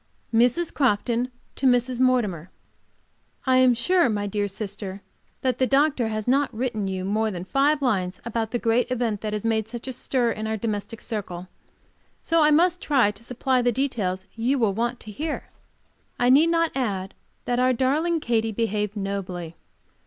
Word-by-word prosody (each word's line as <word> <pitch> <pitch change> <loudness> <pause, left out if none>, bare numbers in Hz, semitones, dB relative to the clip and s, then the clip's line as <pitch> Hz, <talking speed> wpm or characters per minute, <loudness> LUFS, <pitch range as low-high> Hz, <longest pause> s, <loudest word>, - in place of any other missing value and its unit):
Mrs. 245 +9 +3
Crofton 245 -1 +1 0.3
to 270 - +1
Mrs. 245 0 +2
Mortimer: 215 -10 +1 1.0
I 260 -1 +4
am 255 -1 +5
sure, 345 +4 +3
my 205 -2 -1
dear 205 0 -1
sister, 200 -1 -6 0.4
that 255 -2 0
the 260 - +3
doctor 275 -3 +2
has 215 0 -3
not 275 +3 +2
written 220 -3 -2
you 190 -1 -3
more 215 +3 +1
than 180 -3 -5
five 280 +6 +2
lines 190 -7 0
about 230 -1 -2
the 240 - -1
great 235 +1 +1
event 230 -5 -1
which 215 - -2
has 210 +1 -3
made 220 -1 +1
such 235 +2 -7
a 260 - -3
stir 245 -1 0
in 215 0 -4
our 220 0 -1
domestic 215 0 -4
circle. 185 -5 -5 0.7
So 330 -1 +2
I 300 - +5
must 345 +4 +3
try 260 -8 +3
to 210 +2 -13
supply 250 +1 0
the 245 0 +2
details 210 -8 -1
you 245 +5 0
will 220 -6 +2
want 235 +3 -2
to 215 - -9
hear.... 300 +8 -4 0.7
I 245 +1 +3
need 295 +5 +6
not 335 -1 +2
add 200 -8 -2 0.3
that 245 0 0
our 255 0 +4
darling 300 +7 +1
Katy 225 -4 0
behaved 210 -1 -1
nobly. 185 -4 -4
235 Hz, 175 wpm, -24 LUFS, 210-260 Hz, 1.0 s, need